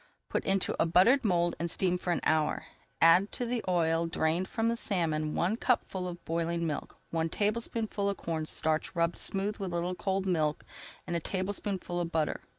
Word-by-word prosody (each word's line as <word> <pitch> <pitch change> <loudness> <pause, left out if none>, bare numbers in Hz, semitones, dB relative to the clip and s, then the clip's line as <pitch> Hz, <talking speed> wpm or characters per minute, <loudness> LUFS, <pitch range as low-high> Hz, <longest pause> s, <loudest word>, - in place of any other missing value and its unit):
Put - - -1
into 195 -1 +1
a - - +3
buttered 230 +11 +5
mould 175 -4 +2
and 170 +1 -1
steam 180 +1 +1
for 180 - -2
an 170 - 0
hour. 155 -1 +1 0.4
Add 175 +5 +6
to 245 - -1
the 235 -1 -2
oil 165 -2 +2
drained 165 +2 0
from 225 0 -1
the 230 - +2
salmon 160 -8 0
one 190 +6 +1
cupful 190 -7 0
of 175 -1 -8
boiling 170 +1 -1
milk, 150 -3 -4
one 165 0 0
tablespoonful 215 0 -1
of 200 - -2
cornstarch 160 0 -1
rubbed 170 0 +1
smooth 200 +2 0
in - - -10
a 195 - -2
little 175 +1 -2
cold 190 +1 -1
milk, 155 -5 0 0.4
and 175 - -3
a - - +1
tablespoonful 185 0 -2
of 170 -1 -2
butter. 160 -2 0
175 Hz, 185 wpm, -30 LUFS, 165-195 Hz, 0.4 s, Add